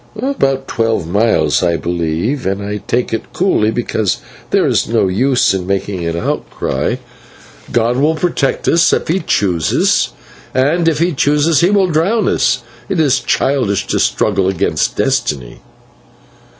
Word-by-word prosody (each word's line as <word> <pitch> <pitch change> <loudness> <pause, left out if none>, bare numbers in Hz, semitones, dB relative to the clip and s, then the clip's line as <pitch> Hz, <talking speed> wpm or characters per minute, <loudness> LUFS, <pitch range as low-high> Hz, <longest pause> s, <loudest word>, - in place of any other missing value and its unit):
"About 135 - -1
twelve 115 -6 -1
miles, 105 +7 +2
I 85 -2 +1
believe, 85 - -2
and 95 +1 -1
I 105 +1 -3
take 120 -1 -1
it 115 - -4
coolly 175 - +1
because 110 -3 -1 0.3
there - - +2
is - - +1
no - - +1
use 125 +5 +2
in 95 -2 -3
making 100 -2 -2
an 85 0 -2
outcry. 85 - -2 0.8
God 120 +1 +1
will 150 +4 +2
protect 155 -5 -1
us 170 0 +4
if - - 0
He 180 +4 +2
chooses, 90 - +1 0.5
and 155 +6 +2
if 160 -2 +2
He 170 +3 +1
chooses 150 +2 +2
He 175 - +4
will 200 -2 +3
drown 180 +7 +1
us. - - +1 0.3
It 180 - -1
is 140 -4 +3
childish 130 -9 0
to - - -1
struggle 95 - +1
against 95 -3 0
destiny." 65 -5 -1
120 Hz, 150 wpm, -15 LUFS, 95-155 Hz, 0.8 s, us